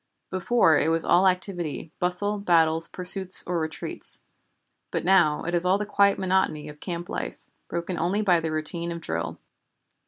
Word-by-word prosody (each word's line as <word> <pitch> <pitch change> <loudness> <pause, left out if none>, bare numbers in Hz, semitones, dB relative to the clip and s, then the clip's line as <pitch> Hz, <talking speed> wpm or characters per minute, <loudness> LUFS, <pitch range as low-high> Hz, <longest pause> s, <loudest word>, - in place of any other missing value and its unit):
Before 185 -3 +3
it 150 - +1
was 165 0 0
all 185 +2 +4
activity, 180 -4 -2
bustle, 200 +4 -1
battles, 165 -4 +2
pursuits 185 +1 +3
or 175 -1 -1
retreats. 160 0 -6 0.7
But - - -3
now 175 -5 +3
it 175 - -4
is 175 0 +2
all 185 +2 +3
the 210 - -3
quiet 200 -1 +3
monotony 185 -6 0
of 150 0 -12
camp 175 -1 -5
life, - - -6 0.2
broken 170 +1 -4
only 190 +6 0
by 180 -4 +4
the 160 -1 -3
routine 170 +2 -3
of 170 - -5
drill. 80 - -4
175 Hz, 165 wpm, -25 LUFS, 165-190 Hz, 0.7 s, all